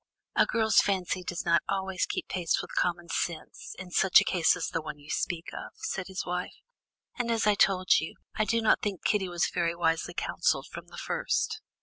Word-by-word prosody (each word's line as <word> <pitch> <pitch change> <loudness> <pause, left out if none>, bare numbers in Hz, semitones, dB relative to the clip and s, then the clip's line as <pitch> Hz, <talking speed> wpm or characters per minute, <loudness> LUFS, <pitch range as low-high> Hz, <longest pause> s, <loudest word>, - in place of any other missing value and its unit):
"A - - +4
girl's 220 -2 +3
fancy 185 -2 0
does 175 -1 -4
not 170 -1 +4
always 190 -1 -1
keep - - -3
pace 175 -3 0
with - - -7
common 175 -1 0
sense, 165 -1 -4
in 180 -1 -9
such 190 +1 +6
a - - +1
case 175 -3 +3
as 180 - -3
the 165 - -2
one 150 -1 -7
you 145 +1 -10
speak 170 -2 -2
of," - - -7
said 190 -1 -4
his 190 -1 -4
wife. 180 0 -3 0.6
"And 240 -1 0
as 225 -2 +1
I 210 - +5
told 190 -2 +4
you, 160 - -5 0.2
I 215 - 0
do 230 +2 +1
not 220 - +4
think 200 -4 -3
Kitty 195 -3 +1
was 175 -1 0
very 170 -1 0
wisely 170 +1 0
counselled - - 0
from - - -8
the - - -12
first." 445 -1 -1
180 Hz, 210 wpm, -29 LUFS, 170-200 Hz, 0.6 s, such